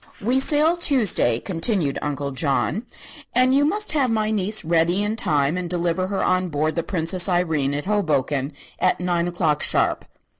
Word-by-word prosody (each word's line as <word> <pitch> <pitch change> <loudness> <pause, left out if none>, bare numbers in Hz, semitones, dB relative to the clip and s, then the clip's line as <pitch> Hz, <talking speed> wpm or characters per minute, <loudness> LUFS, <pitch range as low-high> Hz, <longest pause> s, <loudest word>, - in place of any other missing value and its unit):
"We 245 +6 +1
sail 305 +5 +3
Tuesday," 220 - +2
continued 170 - -1
Uncle 140 -1 -3
John, 150 - -1 0.5
"and 255 +1 +4
you 280 +1 +3
must 420 +3 0
have 275 -4 +1
my 215 -1 0
niece 210 -2 0
ready 170 +4 +2
in 210 +1 -2
time 150 -5 0
and 180 -1 -4
deliver 175 +1 -1
her 195 0 -2
on 185 0 0
board 155 +1 -1
the 170 - 0
'Princess 175 +1 +1
Irene' 160 -6 0
at 145 - -4
Hoboken 150 -8 -1 0.3
at 185 - +1
nine 175 -1 -1
o'clock, 160 -4 -1
sharp." - - 0
180 Hz, 165 wpm, -22 LUFS, 155-215 Hz, 0.5 s, and